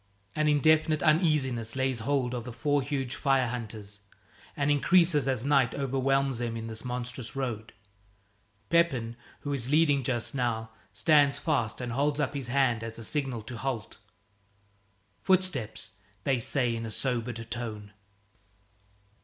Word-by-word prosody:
An 155 Hz, 0 st, +1 dB
indefinite 155 Hz, +1 st, +3 dB
uneasiness 150 Hz, -8 st, +2 dB
lays 130 Hz, -2 st, 0 dB
hold 130 Hz, 0 st, 0 dB
of 120 Hz, -2 st, -3 dB
the 125 Hz, -, -7 dB
four 145 Hz, +5 st, +1 dB
huge 135 Hz, -2 st, -2 dB
fire 135 Hz, -3 st, +2 dB
hunters, 110 Hz, -4 st, -6 dB, 0.6 s
and 145 Hz, 0 st, +2 dB
increases 155 Hz, -1 st, +4 dB
as 130 Hz, -2 st, 0 dB
night 135 Hz, -5 st, +3 dB
overwhelms 135 Hz, -1 st, 0 dB
them 115 Hz, -1 st, -2 dB
in 115 Hz, -, -5 dB
this 110 Hz, -1 st, -5 dB
monstrous 125 Hz, 0 st, -5 dB
road. 120 Hz, -5 st, -3 dB, 1.0 s
Pepin, 135 Hz, -9 st, +2 dB, 0.3 s
who 145 Hz, -, -3 dB
is 130 Hz, -2 st, -2 dB
leading 150 Hz, -2 st, +4 dB
just 120 Hz, 0 st, -2 dB
now, 115 Hz, -4 st, -1 dB, 0.2 s
stands 145 Hz, -3 st, +4 dB
fast 110 Hz, -2 st, -1 dB
and 125 Hz, -1 st, -4 dB
holds 145 Hz, +4 st, 0 dB
up 145 Hz, -1 st, 0 dB
his 135 Hz, -4 st, -4 dB
hand 120 Hz, -3 st, +2 dB
as 115 Hz, 0 st, -6 dB
a 115 Hz, -, -7 dB
signal 130 Hz, -3 st, -2 dB
to 120 Hz, +2 st, -7 dB
halt. 125 Hz, -3 st, -4 dB, 1.2 s
"Footsteps," 165 Hz, -, 0 dB, 0.3 s
they 135 Hz, -3 st, +1 dB
say 125 Hz, -1 st, 0 dB
in 115 Hz, -, -4 dB
a -, -, -5 dB
sobered 120 Hz, -1 st, -2 dB
tone. 110 Hz, -3 st, -5 dB
130 Hz, 145 wpm, -28 LUFS, 115-145 Hz, 1.2 s, increases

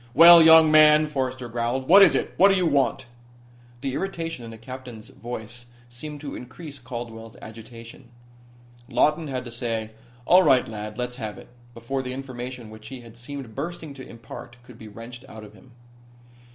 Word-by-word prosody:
"Well, 170 Hz, +3 st, +10 dB
young 160 Hz, -1 st, +7 dB
man," 155 Hz, 0 st, +6 dB
Forrester 130 Hz, -4 st, -3 dB
growled. 120 Hz, +3 st, -3 dB
"What 195 Hz, +4 st, +8 dB
is 190 Hz, -4 st, +6 dB
it? -, -, -2 dB
What 195 Hz, -, +6 dB
do 195 Hz, -, +3 dB
you 185 Hz, -2 st, +1 dB
want?" 135 Hz, -4 st, +1 dB, 0.8 s
The 135 Hz, -1 st, -3 dB
irritation 165 Hz, -5 st, -4 dB
in 115 Hz, -, -8 dB
the 115 Hz, -, -10 dB
captain's 125 Hz, -2 st, -10 dB
voice 120 Hz, 0 st, -8 dB, 0.2 s
seemed 145 Hz, +5 st, -9 dB
to 145 Hz, -2 st, -7 dB
increase 140 Hz, +3 st, -10 dB
Caldwell's 115 Hz, -3 st, -8 dB
agitation. 115 Hz, +2 st, -12 dB, 0.8 s
Lawton 150 Hz, +3 st, +1 dB
had 130 Hz, -2 st, -4 dB
to 120 Hz, -, -8 dB
say: 115 Hz, -2 st, -4 dB, 0.3 s
"All 180 Hz, +6 st, +6 dB
right, 135 Hz, -7 st, +3 dB
lad, 105 Hz, 0 st, -7 dB
let's 125 Hz, 0 st, -4 dB
have 110 Hz, -4 st, -6 dB
it," 120 Hz, -, -14 dB, 0.3 s
before 120 Hz, +4 st, -4 dB
the 125 Hz, -1 st, -6 dB
information 125 Hz, -3 st, -7 dB
which 110 Hz, 0 st, -12 dB
he 130 Hz, +1 st, -9 dB
had 115 Hz, -1 st, -14 dB
seemed 125 Hz, -1 st, -9 dB
bursting 155 Hz, +1 st, -6 dB
to 130 Hz, -2 st, -11 dB
impart 115 Hz, +1 st, -11 dB
could 120 Hz, -2 st, -16 dB
be 110 Hz, -, -10 dB
wrenched 115 Hz, +4 st, -10 dB
out 110 Hz, -1 st, -11 dB
of 105 Hz, -, -13 dB
him. 130 Hz, -, -19 dB
125 Hz, 180 wpm, -24 LUFS, 115-145 Hz, 0.8 s, Well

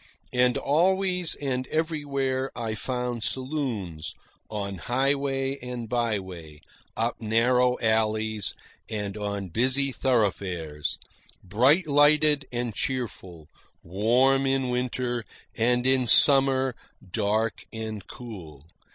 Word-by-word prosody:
And 125 Hz, 0 st, +3 dB
always 180 Hz, +3 st, +1 dB
and 130 Hz, -2 st, -2 dB
everywhere 140 Hz, -5 st, -1 dB
I 115 Hz, -2 st, -3 dB
found 125 Hz, +2 st, -3 dB
saloons, 125 Hz, -, -3 dB, 0.3 s
on 100 Hz, -3 st, -4 dB
highway 135 Hz, +2 st, 0 dB
and 125 Hz, -2 st, -6 dB
byway, 95 Hz, -10 st, -3 dB, 0.4 s
up 115 Hz, +2 st, -1 dB
narrow 125 Hz, +3 st, +3 dB
alleys 110 Hz, -2 st, 0 dB, 0.3 s
and 105 Hz, -2 st, -4 dB
on 100 Hz, -2 st, -4 dB
busy 130 Hz, +8 st, +1 dB
thoroughfares, 95 Hz, -, -1 dB, 0.5 s
bright 130 Hz, -, +3 dB
lighted 145 Hz, 0 st, +4 dB
and 120 Hz, -2 st, -2 dB
cheerful, 95 Hz, -, -4 dB, 0.4 s
warm 125 Hz, +9 st, +2 dB
in 135 Hz, -1 st, +1 dB
winter, 125 Hz, -1 st, -1 dB, 0.3 s
and 120 Hz, +2 st, +2 dB
in 130 Hz, -1 st, +3 dB
summer 135 Hz, +1 st, +5 dB, 0.4 s
dark 110 Hz, +2 st, 0 dB
and 110 Hz, -3 st, -6 dB
cool. 90 Hz, -, -10 dB
125 Hz, 100 wpm, -26 LUFS, 105-135 Hz, 0.5 s, summer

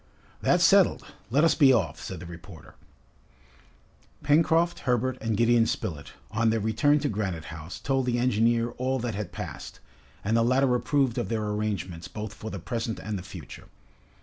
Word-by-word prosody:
"That's -, -, +3 dB
settled. -, -, +5 dB, 0.3 s
Let 140 Hz, +7 st, +3 dB
us 165 Hz, -, +5 dB
be 140 Hz, -4 st, +6 dB
off," 110 Hz, -10 st, 0 dB
said 95 Hz, -, -6 dB
the 90 Hz, -, -9 dB
reporter. 85 Hz, 0 st, -12 dB, 1.5 s
Pencroft, 165 Hz, +3 st, +3 dB
Herbert, 125 Hz, 0 st, 0 dB
and 110 Hz, -2 st, -1 dB
Gideon 115 Hz, 0 st, +4 dB
Spilett, 75 Hz, -5 st, -4 dB, 0.2 s
on 115 Hz, +2 st, +2 dB
their 115 Hz, 0 st, +1 dB
return 110 Hz, +8 st, +2 dB
to 145 Hz, -, 0 dB
Granite 95 Hz, -, -3 dB
House, 80 Hz, +2 st, -8 dB
told 135 Hz, -2 st, 0 dB
the 120 Hz, -1 st, +1 dB
engineer 120 Hz, -1 st, +2 dB
all 130 Hz, +1 st, 0 dB
that 120 Hz, -2 st, -3 dB
had 105 Hz, +1 st, -5 dB
passed, -, -, -7 dB, 0.4 s
and 110 Hz, +3 st, +1 dB
the 115 Hz, -, +4 dB
latter 130 Hz, +2 st, +3 dB
approved 130 Hz, -1 st, +1 dB
of 120 Hz, -, -3 dB
their 110 Hz, -2 st, -1 dB
arrangements 105 Hz, -5 st, -3 dB
both 105 Hz, -1 st, -6 dB
for 110 Hz, +2 st, -7 dB
the 100 Hz, -, -5 dB
present 115 Hz, +4 st, -3 dB
and 110 Hz, -, -5 dB
the 95 Hz, -, -4 dB
future. 90 Hz, -, -10 dB
115 Hz, 175 wpm, -27 LUFS, 100-130 Hz, 1.5 s, be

